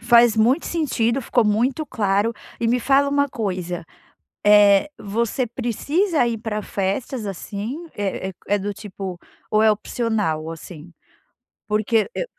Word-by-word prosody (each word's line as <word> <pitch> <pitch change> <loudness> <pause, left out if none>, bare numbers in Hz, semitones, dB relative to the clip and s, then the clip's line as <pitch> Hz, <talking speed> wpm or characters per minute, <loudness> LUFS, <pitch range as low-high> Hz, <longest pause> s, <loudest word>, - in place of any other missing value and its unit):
Faz 235 -1 +5
muito 245 +9 +3
sentido, 270 -7 0
ficou 240 -1 +2
muito 245 +8 +1
claro. 205 -1 +1 0.3
E 230 - +1
me 245 +1 +2
fala 275 +3 +3
uma 285 0 +2
coisa, 180 -7 -3 0.6
eh, 205 +3 +6
você 230 +5 -1
precisa 280 - 0
ir 230 -1 -1
pra 215 -1 -3
festas, 210 +5 -2
assim? 210 - -5
É 195 -1 -2
é - - -9
é 205 - +2
do 205 +1 -3
tipo 190 -3 -7 0.3
ou 215 0 +3
é 220 -1 +6
opcional, 210 -8 -1
assim. 165 0 -10 0.8
Porque 215 - +1
eu - - -2
220 Hz, 140 wpm, -22 LUFS, 200-245 Hz, 0.8 s, eh